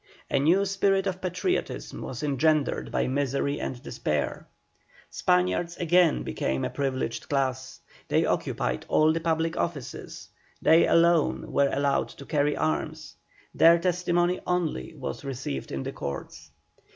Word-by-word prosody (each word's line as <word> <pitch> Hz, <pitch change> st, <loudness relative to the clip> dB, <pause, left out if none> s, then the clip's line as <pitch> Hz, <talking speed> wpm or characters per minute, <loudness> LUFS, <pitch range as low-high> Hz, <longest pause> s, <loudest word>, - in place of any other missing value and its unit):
A 140 Hz, -, +3 dB
new 175 Hz, +8 st, +3 dB
spirit 195 Hz, 0 st, +1 dB
of 185 Hz, -1 st, -3 dB
patriotism 185 Hz, 0 st, -2 dB
was 125 Hz, -, -6 dB
engendered 150 Hz, +1 st, +1 dB
by -, -, +1 dB
misery 140 Hz, +1 st, -1 dB
and 125 Hz, -, -4 dB
despair. -, -, -2 dB, 0.6 s
Spaniards 90 Hz, -, +1 dB
again 175 Hz, -1 st, +3 dB
became 65 Hz, +1 st, -2 dB
a -, -, -3 dB
privileged 135 Hz, -2 st, -3 dB
class, 130 Hz, -2 st, -1 dB, 0.3 s
they -, -, +2 dB
occupied -, -, -1 dB
all 155 Hz, +1 st, +4 dB
the 165 Hz, -, -1 dB
public 165 Hz, 0 st, 0 dB
offices, 150 Hz, -7 st, -5 dB, 0.3 s
they 165 Hz, +1 st, +5 dB
alone 170 Hz, -1 st, +3 dB
were 140 Hz, -1 st, +3 dB
allowed 140 Hz, 0 st, +1 dB
to 140 Hz, -, -12 dB
carry 145 Hz, -1 st, +1 dB
arms, 80 Hz, 0 st, -2 dB, 0.4 s
their 165 Hz, +1 st, +6 dB
testimony 175 Hz, 0 st, +1 dB
only 170 Hz, -, -1 dB
was 70 Hz, -, -6 dB
received 125 Hz, -, -5 dB
in 65 Hz, -1 st, -3 dB
the -, -, -4 dB
courts. 70 Hz, -1 st, -7 dB
150 Hz, 135 wpm, -27 LUFS, 130-175 Hz, 0.6 s, their